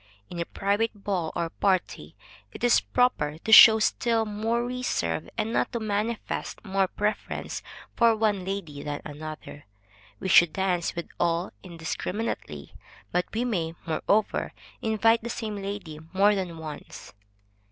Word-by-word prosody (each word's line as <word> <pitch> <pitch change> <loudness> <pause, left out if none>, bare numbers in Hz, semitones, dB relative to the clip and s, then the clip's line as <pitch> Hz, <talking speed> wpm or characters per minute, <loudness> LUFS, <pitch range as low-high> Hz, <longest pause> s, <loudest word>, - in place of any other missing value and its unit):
In 175 - -6
a 170 - -1
private 205 +2 -1
ball 180 -6 -1
or 170 -1 -2
party, 185 - -1 0.4
it - - -10
is 245 - +5
proper 155 -12 +1
to 220 - -4
show 220 0 +11
still 225 +1 +1
more 225 +3 -1
reserve, 245 - -2
and 225 +2 -1
not - - +1
to 235 - -1
manifest 220 +1 -3
more 195 -1 +1
preference 210 +3 -3 0.3
for 230 -1 +4
one 210 -3 +1
lady 180 -7 -5
than 145 -1 -5
another; 150 0 -8 0.5
we - - -4
should 175 -3 +6
dance 185 -3 0
with 170 - -4
all 170 +1 0
indiscriminately, 180 +5 -5 0.4
but 180 0 +1
we 235 +3 -1
may, 170 -8 -2
moreover, 200 +6 0 0.3
invite 225 +1 +3
the 235 - -5
same 215 -3 -4
lady 195 -6 -6 0.2
more 200 +2 +5
than 185 -4 -3
once. 155 -2 -9
195 Hz, 140 wpm, -26 LUFS, 170-220 Hz, 0.5 s, show